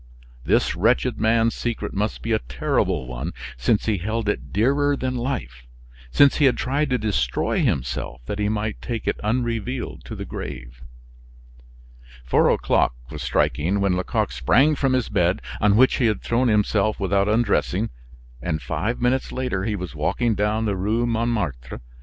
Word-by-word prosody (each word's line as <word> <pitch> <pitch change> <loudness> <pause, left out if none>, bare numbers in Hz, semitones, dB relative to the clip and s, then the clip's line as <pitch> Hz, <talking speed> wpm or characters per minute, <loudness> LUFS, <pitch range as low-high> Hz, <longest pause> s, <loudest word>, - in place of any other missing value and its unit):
This - - +2
wretched 115 +5 +1
man's 115 0 +3
secret 120 -2 -3
must 105 +2 -2
be 115 - -2
a 110 - +3
terrible 60 0 -1
one 65 +7 -5 0.2
since 60 - +1
he 105 -4 0
held 110 +4 -2
it 70 -9 -2
dearer 140 +7 +2
than 130 -1 -2
life, 65 - -4 0.4
since 140 - +5
he 145 - +4
had 130 - +3
tried 140 +3 0
to 125 - +2
destroy 95 - 0
himself 60 -1 -1
that 100 - -4
he 105 0 +1
might 110 0 -2
take 115 -2 -4
it - - 0
unrevealed 120 +2 -2
to - - -7
the - - -6
grave. - - -7 1.4
Four 60 - +3
o'clock - - +2 0.2
was - - -6
striking 90 +7 +1
when 100 -2 +2
Lecoq 90 - -1
sprang 150 +4 +3
from 135 -2 +1
his 130 -3 +1
bed 90 0 +1 0.2
on 105 -1 +4
which 130 +4 +5
he 120 - +3
had 105 -2 -1
thrown 125 +2 +1
himself 105 -1 +2
without 100 0 +1
undressing; 110 - +1 0.5
and 80 -3 -2
five 115 +9 -2
minutes 125 +2 0
later 125 -7 -2
he 110 -2 -1
was 90 -6 -6
walking 120 -2 0
down 105 +2 0
the 100 -2 0
Rue 110 +6 0
Montmartre. 110 - -2
110 Hz, 165 wpm, -23 LUFS, 90-120 Hz, 1.4 s, since